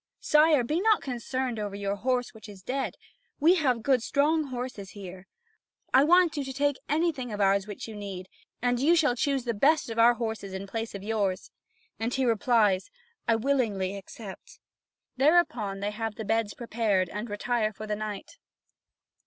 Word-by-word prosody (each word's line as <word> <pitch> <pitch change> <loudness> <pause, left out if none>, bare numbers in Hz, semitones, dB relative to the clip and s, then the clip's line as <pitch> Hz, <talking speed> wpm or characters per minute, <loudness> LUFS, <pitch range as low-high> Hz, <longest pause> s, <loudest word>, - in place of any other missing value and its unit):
Sire, 300 -3 +4
be 305 +9 -1
not 435 +1 +3
concerned 255 -1 -3
over 205 -1 -4
your 200 0 -2
horse 250 +3 -1
which 215 -2 -12
is 195 -2 -12
dead. 270 +4 -2 0.4
We 320 +4 +6
have 255 -8 +1
good 265 -3 +3
strong 300 +5 +1
horses 245 -7 -6
here. 190 -1 -9 0.7
I 265 - +7
want 355 0 +5
you 290 - -1
to 270 - -5
take 285 0 +1
anything 295 -5 0
of 210 - -5
ours 195 0 +2
which 205 +1 -7
you 220 - -8
need, 195 -3 -7 0.4
and 245 0 +2
you 315 +6 +4
shall 295 -7 +3
choose 275 +1 0
the 235 -1 -1
best 280 +4 +2
of 225 - -3
our 240 +1 +6
horses 220 -4 -4
in 190 +1 -5
place 225 +2 -5
of 195 - -7
yours." 200 -4 -1 0.5
And 225 +2 -1
he 265 +1 0
replies: 220 -4 +2 0.4
"I 230 - +4
willingly 220 -7 0
accept." 200 - -10 0.6
Thereupon, 250 - +2
they 205 +1 -1
have 220 0 -4
the 220 - -6
beds 225 0 0
prepared 220 -5 0
and 210 +3 -5
retire 215 +1 0
for 215 +1 -8
the 210 -1 -2
night. 215 - -6
230 Hz, 180 wpm, -28 LUFS, 205-270 Hz, 0.7 s, I